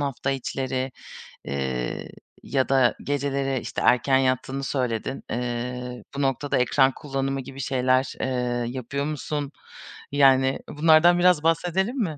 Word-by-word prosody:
hafta 135 -1 -2
içleri? 130 0 -2 0.6
Eee, 65 -3 -3 0.3
ya 135 -2 0
da 130 -3 +4
geceleri 140 -2 -1
işte - - -4
erken 130 +2 +4
yattığını 130 +1 0
söyledin. 130 -1 -2
Eee, 125 +1 -4
bu 140 - -2
noktada 135 +1 0
ekran 130 +2 +3
kullanımı 135 -1 -3
gibi 135 +2 -10
şeyler 130 0 +1
eee, 125 -2 -1
yapıyor 135 +3 -3
musun? 150 -1 -3 0.6
Yani, 135 -1 +4
bunlardan 160 +3 +5
biraz 175 -3 +4
bahsedelim 180 - +1
mi? 165 - -1
135 Hz, 125 wpm, -25 LUFS, 125-145 Hz, 0.6 s, bunlardan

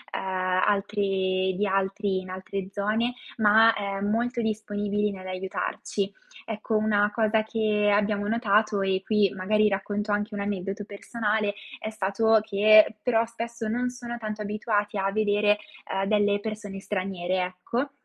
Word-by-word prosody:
uhm, - - -1
altri 190 0 0
di 205 +2 0
altri, 195 0 0
in 185 - -11
altre 190 +1 -5
zone, 220 +5 0 0.2
ma, 220 +1 +6
ehm, 200 0 -2
molto 240 +2 0
disponibili 210 -1 -1
nell'aiutarci. 190 +1 -4 0.3
Ecco, 220 0 -3
una 210 -1 +2
cosa 220 -1 +2
che 215 -1 +1
abbiamo 205 0 +1
notato, 215 -2 +2
e 190 0 0
qui 210 -3 +3
magari 210 +3 +2
racconto 205 +2 -2
anche 205 +1 -1
un 205 - -4
aneddoto 200 0 -3
personale, 210 0 -1 0.3
è 215 - -4
stato 220 +2 +2
che, 215 +1 +5
però 230 -1 +3
spesso, 230 -1 -5
non 245 +3 0
sono 240 -1 -6
tanto 215 -1 -5
abituati 210 0 -1
a 195 0 0
vedere, 210 0 +2 0.4
uhm, 195 0 0
delle 205 -1 +2
persone 210 -2 -6
straniere, 185 -2 -2
ecco. 185 +10 -3
205 Hz, 140 wpm, -26 LUFS, 195-215 Hz, 0.4 s, ma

